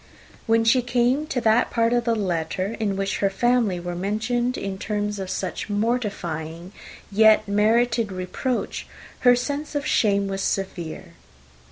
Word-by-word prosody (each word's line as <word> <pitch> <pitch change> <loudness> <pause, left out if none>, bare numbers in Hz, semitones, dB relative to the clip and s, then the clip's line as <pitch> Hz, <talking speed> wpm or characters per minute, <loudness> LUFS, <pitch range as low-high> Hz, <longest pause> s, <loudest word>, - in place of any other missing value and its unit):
When 225 0 +3
she 230 +3 +4
came 245 +4 +1
to 270 -5 -1
that 225 +2 +3
part 230 0 +1
of 240 -1 +1
the 230 -1 +2
letter 185 +1 -2
in 205 -3 0
which 195 0 -2
her 200 - +2
family 225 -2 +1
were 175 0 -5
mentioned, 220 +7 -1
in 195 -1 -4
tones 210 0 -2
of 190 -1 -5
such 185 +1 -4
mortifying, 190 -7 -2 0.4
yet 215 +1 +5
merited, 225 +2 +2
reproach, 185 +7 -3 0.3
her 245 -1 +6
sense 285 +5 -3
of 285 - -1
shame 200 -2 +2
was 195 0 -3
severe. 175 -3 -3
210 Hz, 150 wpm, -23 LUFS, 190-240 Hz, 0.4 s, her